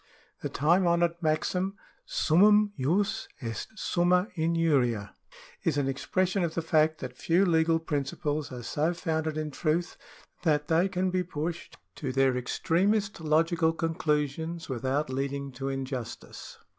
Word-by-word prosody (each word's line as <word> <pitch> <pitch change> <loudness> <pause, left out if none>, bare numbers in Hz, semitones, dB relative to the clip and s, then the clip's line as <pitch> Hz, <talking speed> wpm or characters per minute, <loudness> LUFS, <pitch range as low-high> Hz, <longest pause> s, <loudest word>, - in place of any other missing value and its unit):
The - - -3
time 175 +6 +3
honoured 170 0 +1
maxim, 180 +5 0 0.3
Summumjus 205 0 +3
est 115 -3 -5
summa 180 +3 +2
injuria, 150 - +1 0.5
is 155 -4 +1
an 140 -2 +1
expression 185 +7 0
of 165 -1 -2
the 165 - -1
fact 155 -1 +2
that 125 -2 -6
few 170 +8 +2
legal 165 -2 +3
principles 145 -1 -2
are 125 -1 -7
so 155 +8 0
founded 160 -3 -2
in 155 -1 -3
truth 165 +4 -1 0.4
that 150 -3 +1
they 170 +4 +3
can 185 0 0
be 185 0 +1
pushed 170 0 -5 0.2
to 135 -4 -3
their 135 -1 +3
extremest 195 - 0
logical 160 +1 +2
conclusions 160 0 -1
without 130 +3 -1
leading 140 +1 -3
to 135 +2 -4
injustice. 130 -3 -6
160 Hz, 130 wpm, -28 LUFS, 140-175 Hz, 0.5 s, time